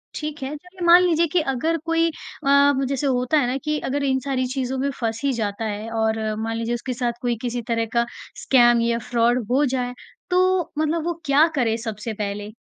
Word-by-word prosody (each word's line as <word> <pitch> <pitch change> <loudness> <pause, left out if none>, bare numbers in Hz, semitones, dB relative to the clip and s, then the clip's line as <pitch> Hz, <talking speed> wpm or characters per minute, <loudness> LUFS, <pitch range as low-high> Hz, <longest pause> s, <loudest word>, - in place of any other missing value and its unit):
ठीक 305 -1 -5
है, 265 - -3
चलिए 360 +3 -8
मान 345 +1 +8
लीजिए 340 -1 +3
कि 330 +2 +1
अगर 325 +6 0
कोई 330 0 +2
अ, 280 -2 +2
जैसे 275 +1 -1
होता 255 +3 +1
है 245 - +1
ना 255 - -1
कि 300 0 -1
अगर 280 +1 -1
इन 265 -1 +1
सारी 260 -2 0
चीज़ों 260 0 -2
में 280 - 0
फँस 225 -1 -2
ही 280 - +2
जाता 220 -1 -3
है 215 +1 -4
और 220 0 0 0.2
मान 225 0 -2
लीजिए 230 +1 -1
उसके 245 +2 -4
साथ 240 -1 -1
कोई 240 -1 0
किसी 245 -1 -2
तरह 230 -1 0
का 235 0 +2 0.4
स्कैम 240 -2 +5
या 235 0 +1
फ्रॉड 240 0 +2
हो 280 +4 +3
जाए, 250 -2 -2 0.4
तो 365 -1 +2
मतलब 315 +1 0
वो 345 - 0
क्या 285 +3 +5
करे 230 -4 +1
सबसे 220 -1 -5
पहले? 205 0 -5
255 Hz, 210 wpm, -22 LUFS, 230-300 Hz, 0.4 s, मान